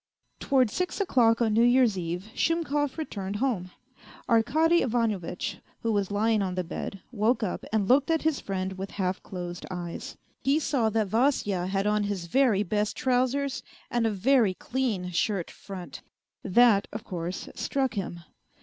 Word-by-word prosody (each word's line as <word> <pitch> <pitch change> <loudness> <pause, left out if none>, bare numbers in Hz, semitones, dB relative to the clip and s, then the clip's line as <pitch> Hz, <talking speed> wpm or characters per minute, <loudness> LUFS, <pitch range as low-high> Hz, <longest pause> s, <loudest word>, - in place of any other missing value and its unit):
Towards 255 -5 +2
six 365 +2 -2
o'clock 240 - +3
on 220 -2 +1
New 225 - +4
Year's 245 -2 +4
Eve 175 +1 -3
Shumkov 295 -4 0
returned 200 -11 -4
home. 210 -6 -1 0.6
Arkady 315 +9 +3
Ivanovitch, 220 -8 -1 0.2
who 230 - +1
was 200 -3 0
lying 215 +1 +2
on 185 -2 -2
the 185 - -1
bed, 185 +2 -6
woke 230 +1 +1
up 190 - -3
and 215 -3 +1
looked 275 +5 +4
at 325 -1 +1
his 315 -3 +1
friend 190 -1 -4
with 195 +1 -4
half 185 -2 -2
closed 175 -2 -6
eyes. 175 -2 -6 0.3
He 275 +2 +3
saw 270 -7 +1
that 215 -2 0
Vasya 210 -6 +1
had 195 +1 0
on 210 0 +2
his 200 -4 -3
very 210 +1 +3
best 210 +2 -1
trousers 260 +2 +1 0.3
and 235 -1 +2
a - - +2
very 215 -1 +3
clean 215 -5 -2
shirt 180 +1 -1
front. 190 -3 -9 0.4
That, 210 0 +4
of 215 - -6
course, 175 0 -5
struck 265 -3 -1
him. 185 -5 -4
215 Hz, 160 wpm, -27 LUFS, 190-255 Hz, 0.6 s, New